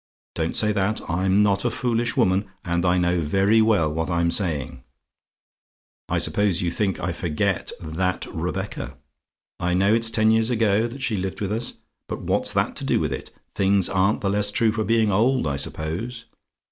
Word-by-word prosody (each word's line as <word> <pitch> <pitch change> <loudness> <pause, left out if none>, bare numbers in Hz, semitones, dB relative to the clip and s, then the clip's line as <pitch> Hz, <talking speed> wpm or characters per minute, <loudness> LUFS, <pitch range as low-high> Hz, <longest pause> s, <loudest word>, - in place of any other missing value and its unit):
Don't 80 0 -2
say 105 -1 +5
that. 105 +1 0
I'm 95 +3 +2
not 100 -1 +1
a - - +1
foolish 120 -1 -1
woman, 95 +2 +2 0.2
and 85 0 0
I 90 +1 +3
know 90 0 +1
very 95 +8 +3
well 100 -9 +2
what 80 +2 -2
I'm 85 -1 +1
saying. 70 -9 -1 1.3
I - - 0
suppose 100 -4 +1
you 85 -2 -1
think 95 +1 -1
I 90 - -2
forget 80 -4 -1
THAT 90 +3 -2
Rebecca? - - -4 0.6
I 90 0 0
know 100 +3 +3
it's 115 0 +2
ten 110 -1 +2
years 110 +1 +2
ago 110 -2 +2
that 130 +3 -8
she 115 - +1
lived 95 0 -4
with 100 -1 -3
us 115 +3 -2 0.3
but - - -5
what's - - +1
that - - 0
to - - -2
do - - +1
with - - -1
it? - - -7 0.2
Things 95 -1 +2
aren't 95 +2 +1
the 100 - 0
less 105 0 +1
true 110 +2 +2
for 110 0 -2
being 110 0 +2
old, 120 +5 +2
I 70 -2 -1
suppose. 90 - -4
100 Hz, 185 wpm, -23 LUFS, 85-110 Hz, 1.3 s, say